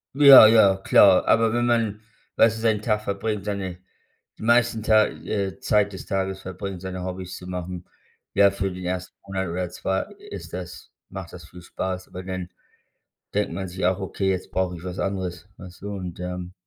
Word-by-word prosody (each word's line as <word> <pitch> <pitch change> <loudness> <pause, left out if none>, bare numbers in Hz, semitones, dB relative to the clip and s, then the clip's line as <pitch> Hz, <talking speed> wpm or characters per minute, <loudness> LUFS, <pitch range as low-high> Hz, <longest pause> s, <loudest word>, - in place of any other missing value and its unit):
Ja 140 -5 +10
ja, 105 -4 +5
klar. 95 0 +5
Aber 115 -1 +3
wenn 120 0 +1
man, 115 -3 0 0.3
weißt 115 -1 +4
du, 110 - -7
seinen 110 -2 +1
Tag 105 -1 0
verbringt, 100 0 -3
seine 100 -3 -4 0.6
die - - -8
meisten 115 -1 +3
Ta 110 -1 +4
äh, 100 -4 -4
Zeit 105 -2 +1
des 95 - -8
Tages 95 0 -2
verbringt, 95 0 -6
seine 95 -1 -5
Hobbys 90 0 -6
zu 90 - -11
machen, 90 -1 -6 0.5
ja, 100 0 +6
für 95 0 -2
den 90 0 -7
1. 90 0 -4
Monat 95 -2 -3
oder 90 +1 -3
2 95 +2 -2 0.3
ist - - -8
das 90 0 -8 0.2
macht 95 -3 -8
das 85 -3 -10
viel 90 +2 -13
Spaß, 95 +1 -5
aber 90 0 -8
dann 95 -1 -5 0.9
denkt 105 0 0
man 95 - -4
sich 90 +1 -5
auch: 95 +1 +1
„Okay, 95 0 -2
jetzt 95 -1 -3
brauche 90 -1 -1
ich 85 - -12
was 90 0 -6
anderes.“ 95 -1 -4
Weißt 90 0 -13
du? 100 - -5
Und, 90 -2 -7
ähm 90 0 -5
95 Hz, 190 wpm, -24 LUFS, 90-105 Hz, 0.9 s, Ja